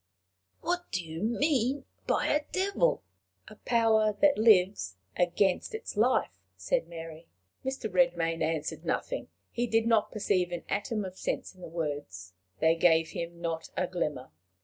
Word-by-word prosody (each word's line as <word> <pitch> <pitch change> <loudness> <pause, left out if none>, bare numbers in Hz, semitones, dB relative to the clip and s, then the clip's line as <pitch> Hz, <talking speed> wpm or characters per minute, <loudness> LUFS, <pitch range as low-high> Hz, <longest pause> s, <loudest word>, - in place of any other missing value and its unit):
"What 355 +1 -2
do 185 -5 -2
you 160 +1 -6
mean 265 +3 +1 0.2
by - - +2
a 295 0 +1
devil?" 400 +6 +1 0.4
"A - - -11
power 220 -2 +3
that 290 -1 +5
lives 190 - +4 0.2
against 180 - +1
its 445 - -6
life," 210 - +2 0.2
said 90 - 0
Mary. 165 -1 -9 0.4
Mr. 265 -4 -3
Redmain 170 -3 +1
answered 155 -1 -2
nothing. - - -2 0.2
He 240 +1 -1
did 225 0 +2
not 225 -2 +3
perceive 185 -4 0
an 175 - -4
atom 205 +1 -1
of 185 0 -8
sense - - -3
in 185 - -18
the - - -7
words. 145 - -5 0.3
They 160 +1 +5
gave 165 -1 +4
him 170 0 -6
not 165 -1 -3
a 185 - +2
glimmer. 150 -8 -3
185 Hz, 150 wpm, -29 LUFS, 165-230 Hz, 0.4 s, that